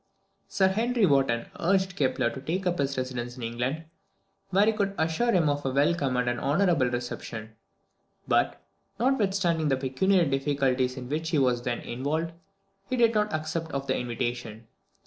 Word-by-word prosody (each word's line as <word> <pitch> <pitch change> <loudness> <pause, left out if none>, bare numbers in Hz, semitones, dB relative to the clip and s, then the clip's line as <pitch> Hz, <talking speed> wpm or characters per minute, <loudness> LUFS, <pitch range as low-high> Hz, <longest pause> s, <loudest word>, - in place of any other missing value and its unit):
Sir 190 -1 +2
Henry 230 +3 +2
Wotton 135 -7 +2
urged 190 +1 +1
Kepler 130 -3 +1
to 130 - -7
take 180 +7 -2
up 175 -1 0
his 140 -1 0
residence 125 -1 -4
in 125 - -7
England, 125 +7 -2 0.6
where 195 +2 +4
he 220 - +3
could 200 -2 -1
assure 160 +10 +1
him 175 -6 +3
of 145 0 0
a 135 - 0
welcome 140 -1 +1
and 125 0 0
an 120 0 0
honourable 155 -2 +2
reception; 115 -2 -5 0.7
but, 65 - +2 0.4
notwithstanding 195 - +1
the 135 -2 +2
pecuniary 170 +8 +2
difficulties 135 -2 0
in 125 -1 -6
which 155 +4 -2
he 160 - +1
was 125 -3 +2
then 120 0 -2
involved, 150 +7 -2 0.6
he 255 - 0
did 230 -1 +4
not 210 -1 +1
accept 160 +1 -3
of 140 0 -2
the - - 0
invitation. 120 -2 -4
145 Hz, 165 wpm, -27 LUFS, 125-185 Hz, 0.7 s, where